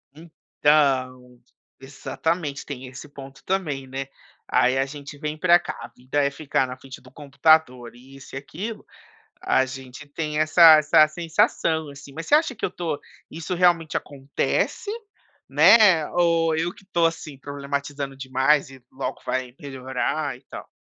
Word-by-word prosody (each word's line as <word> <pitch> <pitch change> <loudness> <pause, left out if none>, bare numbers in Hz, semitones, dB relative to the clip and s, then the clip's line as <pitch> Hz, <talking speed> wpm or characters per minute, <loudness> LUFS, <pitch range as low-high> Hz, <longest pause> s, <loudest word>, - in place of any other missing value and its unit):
Então, 135 -6 0 0.4
exatamente, 145 +2 -4
tem 130 -3 -7
esse 130 +3 -10
ponto 135 -1 -12
também, 150 -9 -2
né. 135 +1 -5 0.4
Aí 130 +1 +2
a 135 - +1
gente 145 +1 -10
vem 150 +1 -4
pra 175 +1 +5
cá, - - -7
a 120 - -7
vida 130 +4 -2
é 140 - +2
ficar 140 -2 -1
na 125 - -8
frente 130 0 -12
do 130 - -16
computador 140 -4 +1
e 130 +3 -16
isso 135 - -12
e - - -3
aquilo, 200 +11 -7 0.6
a 130 - +2
gente 130 +2 -10
tem 150 +1 -3
essa 155 0 +7
essa 155 0 +5
sensação, 160 -1 0
assim, 140 0 -12
mas 165 +2 -7
você 295 - +5
acha 305 -4 +1
que - - -3
eu - - -2
estou, 170 -5 -4 0.3
isso 165 +3 -5
realmente 175 -3 +2
acontece, 140 - -2 0.6
né, 170 +2 +6
ou 165 -2 +2
eu 165 +3 -1
que - - -19
estou, 175 -3 0
assim, 160 -3 -3
problematizando 140 0 -5
demais 135 +2 +1
e 130 -2 -15
logo 130 0 -5
vai 130 -1 -3
melhorar 135 +1 -3
e - - -23
tal? - - -9
145 Hz, 160 wpm, -23 LUFS, 135-160 Hz, 0.6 s, essa